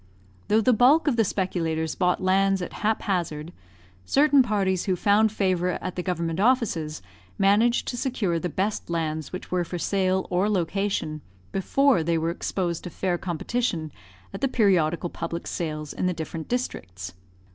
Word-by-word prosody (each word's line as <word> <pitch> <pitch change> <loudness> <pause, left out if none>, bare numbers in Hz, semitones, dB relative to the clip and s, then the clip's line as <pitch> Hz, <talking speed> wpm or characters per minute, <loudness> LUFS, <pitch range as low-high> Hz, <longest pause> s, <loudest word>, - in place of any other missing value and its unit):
Though 215 +1 +4
the 250 +3 +4
bulk 265 +9 +5
of 280 - +3
the 225 - +4
speculators 165 -5 -1
bought 180 0 +1
lands 195 +1 +3
at - - -6
haphazard, 175 -7 -1 0.5
certain 285 - +4
parties 195 -6 0
who 185 - +1
found 205 +4 +3
favour 185 -4 0
at 185 - -5
the 180 - -2
government 170 -2 -2
offices 195 - +1 0.3
managed 215 +5 +3
to 245 - -4
secure 210 -10 -1
the 180 - -3
best 195 +4 -2
lands 160 -2 -2
which 185 - -7
were 180 -1 +1
for 175 +1 -5
sale 190 +1 0
or 185 +4 +2
location, 180 -4 -1 0.3
before 265 +2 +2
they 165 +1 +1
were 165 +1 0
exposed 175 -1 -2
to - - -4
fair 175 +1 -2
competition 175 -2 -2 0.4
at - - -6
the 270 - +3
periodical 175 -8 +2
public 170 0 -5
sales 155 -3 -4
in 185 - -1
the 180 - +1
different 160 0 -5
districts. 95 - -4
185 Hz, 160 wpm, -25 LUFS, 165-210 Hz, 0.5 s, bulk